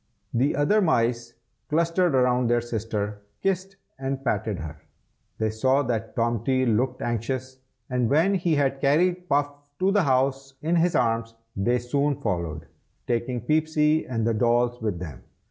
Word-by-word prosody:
The 130 +5 +2
other 145 +10 +3
mice 120 - +1 0.3
clustered 170 +2 +2
round 125 -1 +3
their 120 0 +3
sister, 115 -3 -2
and 105 0 -12
kissed 195 0 -1 0.2
and 135 0 -3
patted 105 -3 -1
her. 80 -2 -7 0.6
They 110 -1 0
saw 130 +6 +2
that 115 -3 -3
Tomty 120 +2 +1
looked 125 +3 0
anxious, 130 +3 -3 0.3
and 125 -3 0
when 160 +8 +3
he 175 -4 +1
had 135 -1 0
carried 175 +5 +2
Puff 145 +1 +3
up 145 0 -21
to 190 +1 +2
the 205 0 +3
house 135 -1 0
in 170 +2 +2
his 170 +1 +2
arms, 115 -1 0 0.2
they 120 +6 +1
soon 140 +3 0
followed, 85 -3 -3 0.4
taking 120 +1 -1
Peepsy 155 +3 +2
and 115 -3 -1
the 115 - +2
dolls 120 +1 +1
with 105 -5 -1
them. 80 -8 -8
125 Hz, 160 wpm, -25 LUFS, 115-145 Hz, 0.6 s, other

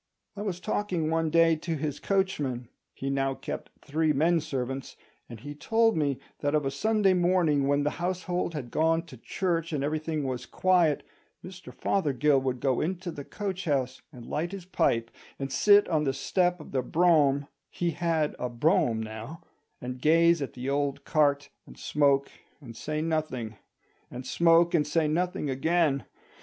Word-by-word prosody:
I 205 - -6
was 195 -4 -3
talking 180 -6 -1
one 165 0 +1
day 165 0 +4
to 165 +1 -3
his 150 -1 -3
coachman 145 - -1 0.3
(he 135 0 -3
now 135 0 0
kept - - -6 0.2
three 155 +1 +1
men 165 +4 +3
servants), 135 -3 -4 0.3
and 115 -2 -9
he 145 +1 -7
told 225 +9 +2
me 145 -4 0 0.2
that 145 +1 0
of 150 -2 +1
a 135 - 0
Sunday 205 +6 +2
morning 175 -6 +2
when 145 0 +2
the 150 - 0
household 180 -1 -2
had 125 -5 -6
gone 165 +1 +2
to 150 - -12
church 165 +6 -2
and 145 -3 -1
everything 155 +1 -2
was 125 -2 -4
quiet, 175 -5 +2 0.4
Mr 185 0 -10
Fothergill 145 -6 +1
would 130 -1 -2
go 130 0 +1
into 180 +2 -3
the 145 - -7
coach 190 +2 -5
house 130 -4 -1
and 120 -2 -11
light 170 +8 -3
his 190 -3 -7
pipe, 115 -10 0 0.3
and 135 -1 -4
sit 205 +4 +5
on 155 -3 +1
the 135 -2 0
step 180 +6 0
of 150 - -11
the 130 - 0
brougham 145 -2 +3 0.2
(he 175 -1 -1
had 160 -2 0
a 125 - -2
brougham 120 - +1
now), 110 +9 -8 0.4
and 125 0 -6
gaze 165 +2 +4
at 140 - -4
the 125 +1 -6
old 140 0 -1
cart, 145 -2 +2 0.2
and - - -14
smoke 140 -2 +2 0.3
and 120 -6 -11
say 155 +5 -3
nothing; 155 -9 -2 0.5
and 125 +1 -8
smoke 170 +1 +4
and 155 -3 +2
say 155 +1 +1
nothing 175 0 -1
again. 140 0 +1
155 Hz, 175 wpm, -28 LUFS, 135-175 Hz, 0.5 s, sit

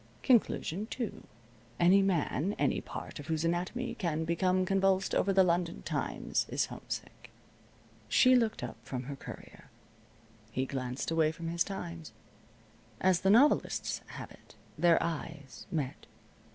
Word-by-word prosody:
Conclusion 215 -5 +2
two: 235 -3 -5 0.5
Any 185 +3 +6
man, 190 0 0
any - - +1
part - - -7
of 145 - -9
whose 160 0 0
anatomy 180 +9 -1
can 160 -5 -2
become 185 +2 +1
convulsed 195 0 +2
over 195 - +2
the 190 0 +5
London 175 -1 0
Times - - -1
is - - +1
homesick. - - -7 0.8
She 255 0 +6
looked 230 -3 +1
up - - -5
from 125 -2 -5
her 140 +2 -6
Courier. - - -11 0.8
He 130 +3 -1
glanced 130 +1 -3
away 160 -1 +3
from 165 0 -6
his 170 +1 +1
Times. 170 - -7 0.9
As 185 -2 +3
the 190 - +2
novelists 250 +9 +3
have - - -8
it, - - -18 0.2
their 170 -1 +4
eyes 160 -4 -6
met. 145 -6 -3
175 Hz, 140 wpm, -31 LUFS, 160-195 Hz, 0.9 s, Any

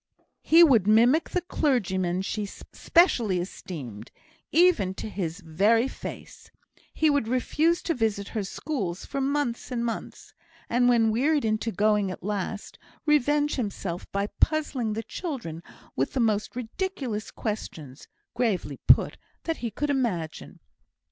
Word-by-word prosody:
He 330 +2 +7
would 235 - +5
mimic 240 +9 +4
the 360 - -1
clergyman 190 - 0
she 205 +1 -3
specially 235 - +2
esteemed, 140 - -7 0.4
even 310 - +4
to - - -5
his 185 -3 -4
very 205 +9 +2
face; - - -9 0.4
he 310 -1 +2
would 285 -6 +1
refuse 310 +7 +1
to 335 - 0
visit 220 -6 -1
her 215 - -2
schools 195 - -4
for 275 - -3
months 275 -3 -1
and 240 -2 -2
months; 230 - -6 0.3
and, 245 +1 +3
when 230 -2 +4
wearied 280 +4 +2
into 220 +1 0
going 210 0 +2
at 185 - -7
last, 205 +1 -4 0.3
revenge 295 0 +2
himself 200 -6 -4
by 200 0 0
puzzling 285 -8 +1
the 225 +1 -3
children 225 - -5 0.3
with 135 - -1
the 265 - -1
most 220 -2 0
ridiculous 250 - -4
questions 155 - -6 0.3
(gravely 185 - -1
put) - - +5 0.3
that 330 -1 -2
he 235 - -3
could 290 +7 -2
imagine. 195 - -2
225 Hz, 135 wpm, -26 LUFS, 195-280 Hz, 0.4 s, He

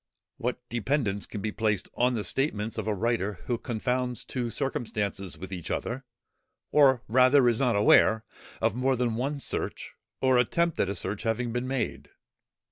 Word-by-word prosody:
What 125 +1 -3
dependance 115 -3 -1
can 105 - -6
be 105 - -2
placed 105 -2 0
on 125 +1 +2
the 110 - -2
statements 110 -5 -1
of - - -4
a 110 - +1
writer 105 -1 0
who 120 -2 -1
confounds 125 +1 -2
two 125 -3 -3
circumstances 105 - -2
with 95 +3 -8
each 90 -3 -5
other, 130 +3 -3 0.7
or 135 -5 +5
rather 130 +3 +5
is 115 -2 +2
not 125 -5 +2
aware, 110 +2 +5 0.4
of - - +3
more 130 +3 +1
than 120 -2 0
one 135 +5 -2
search, - - -3 0.3
or 130 -1 +4
attempt 170 +7 +1
at 95 - +2
a 100 - -2
search 100 +3 -3
having 115 +1 -1
been 125 +1 -2
made! 130 -3 -3
120 Hz, 170 wpm, -28 LUFS, 105-130 Hz, 0.7 s, or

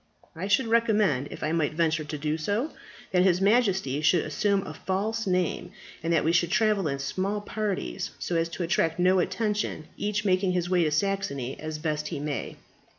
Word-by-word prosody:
I 180 +4 -4
should 205 +6 +3
recommend, 215 - +2
if - - -8
I 155 - 0
might 155 -2 0
venture 160 -1 +1
to 150 0 -5
do 150 +1 -1
so, 205 - -1 0.4
that 180 -1 +4
his 180 -1 +4
Majesty 195 - +2
should 160 +2 +3
assume 200 +5 0
a - - -6
false 215 +4 -2
name, 180 -2 -1 0.3
and 165 - -1
that 165 - +3
we 160 - +2
should 170 0 +2
travel 210 -2 +2
in 140 -1 -1
small 190 +9 -2
parties 205 - -3
so 175 - -3
as 165 0 +1
to 170 +2 -4
attract 165 -1 +1
no 185 +1 +4
attention, 210 -4 -1
each 210 +1 -1
making 185 -1 +2
his 175 -1 0
way 175 -2 +4
to - - +2
Saxony 155 -7 -1
as 155 0 -4
best 150 -1 -2
he 145 - -4
may." 145 -5 -4
180 Hz, 195 wpm, -27 LUFS, 155-205 Hz, 0.4 s, that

